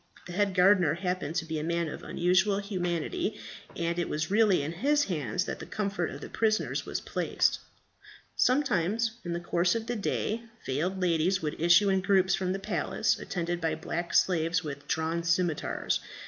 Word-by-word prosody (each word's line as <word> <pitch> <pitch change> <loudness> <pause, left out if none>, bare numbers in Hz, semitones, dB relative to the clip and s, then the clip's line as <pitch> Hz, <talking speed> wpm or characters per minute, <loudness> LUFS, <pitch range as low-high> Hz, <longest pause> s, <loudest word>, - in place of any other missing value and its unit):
The 175 - -8
head 200 0 +1
gardener 180 -4 +5
happened 180 -3 -3
to 175 -2 0
be 160 -1 -3
a - - -3
man 170 +1 0
of 155 - -6
unusual 185 +3 +2
humanity, 185 0 -2 0.4
and 170 0 -1
it 175 - -1
was 155 +3 -2
really 205 -7 +4
in 150 - -3
his 290 - +2
hands 155 - -2
that - - -5
the - - -7
comfort 200 -5 -2
of 140 - -8
the - - -6
prisoners 220 -1 0
was - - -2
placed. - - 0 0.8
Sometimes 230 - +2
in 175 - -3
the 170 - -2
course 175 +3 +1
of 225 -1 -2
the 240 +1 -2
day, 215 +1 -1 0.2
veiled 170 +8 -1
ladies 180 0 +1
would 155 0 -3
issue 175 +4 +5
in 190 -1 +2
groups 190 -1 +3
from 185 -1 0
the 190 - -1
palace, 195 -6 0
attended 175 -1 -3
by 160 -1 0
black 170 +2 -4
slaves 165 -1 +2
with 140 -2 -7
drawn 160 +1 -1
scimitars. 170 -2 0
175 Hz, 180 wpm, -29 LUFS, 165-200 Hz, 0.8 s, gardener